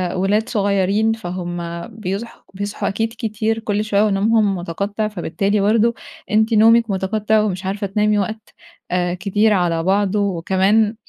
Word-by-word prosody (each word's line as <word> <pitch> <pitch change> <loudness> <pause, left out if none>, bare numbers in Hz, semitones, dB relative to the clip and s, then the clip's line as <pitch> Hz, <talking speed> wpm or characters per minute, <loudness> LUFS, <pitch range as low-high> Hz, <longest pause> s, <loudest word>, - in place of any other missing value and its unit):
ولاد 205 +4 +1
صغيّرين 200 +1 +1
فهُم 175 -4 -5 0.3
بيصحوا 220 0 -6
بيصحوا 200 +2 -4
أكيد 225 +3 -2
كتير 225 0 -1
كل 210 -1 -1
شوية 210 -1 +2
ونومهم 210 0 +2
مُتقطّع، 200 +5 -3
فبالتالي 200 +1 -1
برضو 225 +3 +3 0.4
أنتِ 220 +2 +2
نومِك 230 +1 +5
مُتقطّع 210 +3 +1
ومش 190 -3 -2
عارفة 200 +1 -2
تنامي 210 +1 +1
وقت 215 +2 -5 0.4
آآ، 180 -1 0
كتير 205 +4 +1
على 170 -3 +1
بعضه، 200 +2 +1
وكمان 200 +3 +1
205 Hz, 135 wpm, -19 LUFS, 190-220 Hz, 0.4 s, نومِك